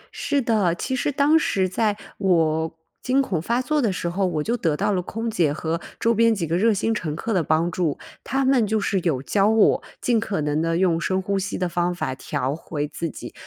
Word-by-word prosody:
是 285 - 0
的， 205 -7 +2
其 260 - -3
实 260 - 0
当 290 +3 +4
时 190 -10 +1
在 205 +2 0 0.2
我 160 -4 +1 0.2
惊 260 +2 +1
恐 190 - 0
发 235 +8 0
作 300 +2 +1
的 225 - +1
时 175 -1 -3
候， 185 +3 0
我 155 -4 -1
就 235 - 0
得 165 -10 0
到 - - +1
了 180 - 0
空 225 +6 -5
姐 170 -9 +1
和 160 +3 -3 0.2
周 230 - +2
边 230 0 +3
几 180 -5 -2
个 165 +1 -1
热 220 +6 +3
心 220 +2 0
乘 155 -7 -3
客 225 +7 -3
的 185 - +2
帮 160 +3 +1
助。 165 -4 -1 0.3
他 270 0 0
们 260 -5 +3
就 215 +1 +1
是 200 -1 0
有 155 -7 -1
教 200 +7 +2
我 220 -1 +4 0.2
尽 240 -2 +2
可 215 -5 -2
能 150 +1 0
地 165 0 0
用 170 -2 +2
深 185 +2 0
呼 195 +1 -1
吸 195 +1 -3
的 180 - 0
方 175 0 -1
法 130 - -2
调 130 +1 -3
回 150 -2 -4
自 165 +2 -4
己， - - -9
185 Hz, 250 characters per minute, -23 LUFS, 165-225 Hz, 0.3 s, 当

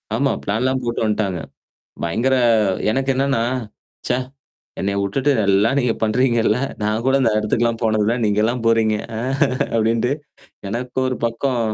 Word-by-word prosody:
ஆமா. - - +1
பிளான்லாம் 130 +6 0
போட்டு 120 -1 -2
வந்துட்டாங்க. 100 -5 -1 0.6
பயங்கர 120 +10 +1 0.6
எனக்கு 135 +2 -1
என்னன்னா? 135 -3 +1 0.6
ச்சே - - +1 0.6
என்னைய 100 +1 -1
வுட்டுட்டு 130 +9 0
நல்லா 100 +2 +3
நீங்க 125 -3 +2
பண்றீங்கல்ல. 115 0 +2 0.2
நான் 110 +3 -1
கூட 135 - +3
இந்த 115 -3 +3
இடத்துக்குல்லாம் 115 +2 0
போனதுல 110 0 +2
நீங்கலாம் 110 +4 +1
போறீங்க. 110 -2 +3 0.2
அ - - -3 0.6
அப்டின்ட்டு, 115 +3 +1 0.6
எனக்கு 125 +3 -3
ஒரு 130 - -1
பக்கம் 120 +2 -1
115 Hz, 130 wpm, -20 LUFS, 105-125 Hz, 0.6 s, நல்லா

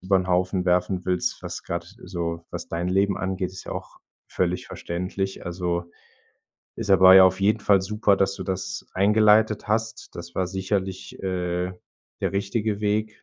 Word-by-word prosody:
über 95 +1 +2
'n 90 0 0
Haufen 90 +1 +1
werfen 90 0 +1
willst, 90 -1 -1
was - - -5
grad - - -4 0.2
so 85 -2 -4
was - - -6
dein 85 +2 -2
Leben 95 +1 +2
angeht, 95 -1 -2
ist 95 - -9
ja - - -8
auch - - -8 0.3
völlig - - -1
verständlich. 90 +2 -4
Also, 85 0 -2 0.9
ist - - -5
aber 95 0 +8
ja 95 - +10
auf 95 +1 +3
jeden 105 +2 +2
Fall 100 -2 +4
super, 105 0 +2
dass 95 0 +1
du - - -6
das 95 -1 -4
eingeleitet 105 +2 +4
hast. 110 +1 -1
Das 85 0 -9
war 95 - 0
sicherlich, 95 0 -3
äh, 90 -1 -2 0.5
der - - 0
richtige 105 +1 -1
Weg. 105 0 -1
95 Hz, 170 wpm, -24 LUFS, 90-100 Hz, 0.9 s, ja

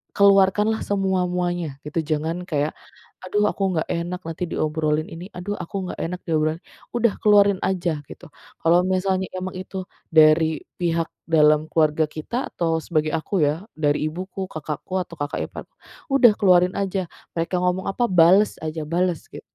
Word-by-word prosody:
keluarkanlah 200 +2 +4
semua-muanya 180 -5 -1
gitu 150 +2 -3
jangan 160 +3 -2
kayak, 150 -3 0 0.6
"Aduh 210 +3 +1
aku 195 -2 -1
nggak 160 - +1
enak 175 +2 -3
nanti 165 +2 -4
diobrolin 155 -1 -1
ini, 170 +3 -8
aduh 200 +3 -4
aku 175 +2 -7 0.2
nggak - - -9
enak 180 +2 -4
diobrolin." 155 +1 0 0.3
udah 235 -3 +2
keluarin 205 -2 +5
aja 175 -5 0
gitu, - - -12 0.4
kalau 170 +2 +5
misalnya 190 0 0
emang 185 0 -4
itu 185 0 -6 0.2
dari 155 -1 +4 0.2
pihak 165 -2 0 0.2
dalam 155 -1 +4
keluarga 155 -1 +2
kita, 160 - -4
atau 165 -2 0
sebagai 155 -1 -1
aku 165 +2 0
ya, 155 +8 -1
dari 150 0 +1
ibuku, 185 +4 -5
kakakku, 155 +3 -5
atau 170 - -13
kakak 145 0 -3
ipar, - - -7 0.5
udah 265 -4 +7
keluarin 180 -2 +5
aja 195 -2 -2 0.3
mereka 170 +2 -1
ngomong 180 +1 0
apa 240 +5 0
bales 185 +3 +5
aja, 160 0 -3
bales 175 0 -1
git - - -9
175 Hz, 155 wpm, -23 LUFS, 155-190 Hz, 0.6 s, udah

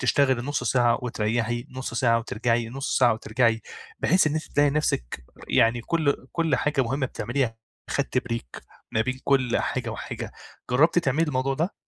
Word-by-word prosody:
تشتغلي 130 -4 +2
نُصّ 145 -2 -2
ساعة، 120 -1 +3
وتريحي 120 +1 -1
نُصّ 130 -2 -6
ساعة، 115 -2 +3
وترجعي 115 0 -1
نُصّ 135 +3 -2
ساعة 125 -3 +5
وترجعي، 115 0 +1 0.4
بحيث 185 0 +4
إن 150 - +1
أنتِ 155 - -2
تلاقي 145 0 +4
نَفسِك 65 - -1 0.2
يعني 115 +1 +3
كُلّ، 145 -5 0
كُلّ 165 -6 +1
حاجة 140 0 +1
مهمة 130 +3 -1
بتعمليها 120 0 -2 0.3
خدتي 135 -2 0
break 115 - -6 0.3
ما 110 - +2
بين 130 +2 -3
كُلّ 130 -3 +2
حاجة - - -2
وحاجة، - - -6 0.4
جربتِ 160 +7 +4
تعملي 155 +2 +1
الموضوع 135 0 0
ده؟ 165 +7 -1
130 Hz, 160 wpm, -25 LUFS, 115-140 Hz, 0.4 s, ساعة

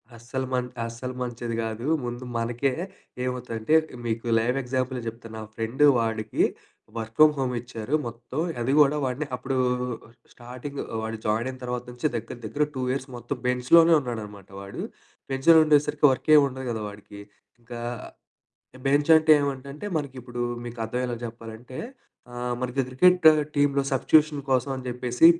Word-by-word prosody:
అస్సలు 125 +3 -4
మంట్ 125 -1 -1
అస్సలు 115 +2 -6
మంచిది 120 -1 -3
గాదు. 115 +2 -4 0.2
ముందు 120 +1 -5
మనకే 120 +4 0 0.5
ఏమవుతదంటే 125 0 -2 0.3
మీకు 115 +1 -2
లైవ్ 120 +4 0
ఎగ్జాంపులే 130 0 -2
జెప్తాను. 115 0 -7
మా 110 - -6
ఫ్రెండు 115 +6 +2
వాడికి 110 -1 0 0.5
వర్క్ 110 0 -5
ఫ్రమ్ 155 0 +7
హోమ్ 130 -2 -1
ఇచ్చారు 120 +3 -3
మొత్తం. 120 +4 -6 0.2
అది 125 - 0
కూడా 145 0 +6
వాడిని 130 +4 -2
అప్పుడు 130 +1 -3 0.8
స్టార్టింగ్ 125 +4 -7 0.2
వాడు 110 0 -4
జాయినయిన 115 +5 0
తర్వాత 125 0 -3
నుంచి 125 +4 -1
దగ్గర 115 - -4
దగ్గర 130 +8 0
2 130 - -4
ఇయర్స్ 130 0 -3
మొత్తం 120 +3 -5
బెంచ్‌లోనే 125 +7 +5
ఉన్నాడనమాట 105 -6 -7
వాడు. 100 0 -7 0.5
బెంచ్‌లో 135 +5 +6
ఉండేసరికి 150 0 +3
వర్కేం 150 +3 +5
ఉండదు 130 0 -7
గదా 110 -2 -3
వాడికి. 100 0 -12 0.4
ఇంకా 120 0 -8 1.1
బెంచంటే 155 +3 +5
ఏమంటంటే 140 +5 -4
మనకిప్పుడు 125 -4 -6 0.2
మీకు 120 0 -8
అర్థమయ్యేలా 125 +1 -2
చెప్పాలంటే. 115 +2 -9 0.5
ఆహ్, 120 0 -2
మనకి 125 +1 -1
క్రికెటు 160 +5 +6 0.2
టీములో 145 -1 +3
సబ్‌స్టిట్యూషన్ 150 +2 +4
కోసమని 130 0 0
జెప్పేసి 125 +3 +3
125 Hz, 135 wpm, -26 LUFS, 115-140 Hz, 1.1 s, ఫ్రమ్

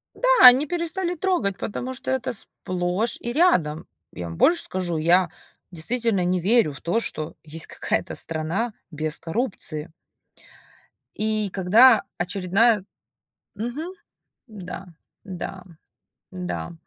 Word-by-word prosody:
Да, - - -1 0.2
они 260 +4 +8
перестали 345 +2 -2
трогать, 310 - 0
потому 255 +4 -4
что 255 - -7
это 260 -3 -1
сплошь 185 +2 -2
и 240 0 -4
рядом. 175 - +2 0.3
Я 85 -1 -6
вам 85 - -8
больше 335 +2 +3
скажу, 180 -3 -3
я 175 +2 +3 0.4
действительно 210 +3 0
не 180 +1 +1
верю 210 -2 +3
в 140 - -9
то, 225 +7 0
что 155 -4 -5
есть 160 +1 -5
какая-то - - -2
страна 165 +8 -2 0.2
без 155 0 -3
коррупции. 165 -6 -4 1.2
И 215 -1 0
когда 215 +6 +5
очередная 195 +4 +2 0.7
Мгм. 285 - -5 0.5
Да, 195 -3 -8 0.4
да, 185 -1 -7 0.7
да. 180 -1 -5
195 Hz, 115 wpm, -24 LUFS, 175-240 Hz, 1.2 s, они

